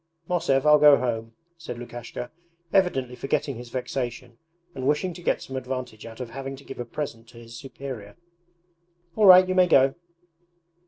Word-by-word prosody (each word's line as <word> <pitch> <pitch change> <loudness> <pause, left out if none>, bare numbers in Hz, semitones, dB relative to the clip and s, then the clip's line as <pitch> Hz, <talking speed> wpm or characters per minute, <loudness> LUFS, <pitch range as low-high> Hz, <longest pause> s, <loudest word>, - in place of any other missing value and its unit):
'Mosev, 140 -6 +1
I'll 150 0 +7
go 145 -1 +8
home,' 115 -2 -3 0.3
said 160 -7 -7
Lukashka, 120 0 -7 0.4
evidently 135 -11 +1
forgetting 140 +1 -2
his 120 0 -9
vexation 125 -1 -5 0.3
and 130 -3 -4
wishing 160 +5 +1
to 175 - -11
get - - 0
some 135 - -8
advantage 125 -4 -5
out 115 +1 -11
of 125 -2 -6
having 135 +2 -6
to 135 - -15
give 135 - -10
a 120 - -3
present 115 -3 -6
to 120 - -16
his 115 0 -12
superior. 130 -4 -8 1.0
'All 210 -2 +4
right, 185 0 +9
you 185 - 0
may 185 -1 +5
go!' 135 -4 +5
130 Hz, 170 wpm, -25 LUFS, 120-150 Hz, 1.0 s, right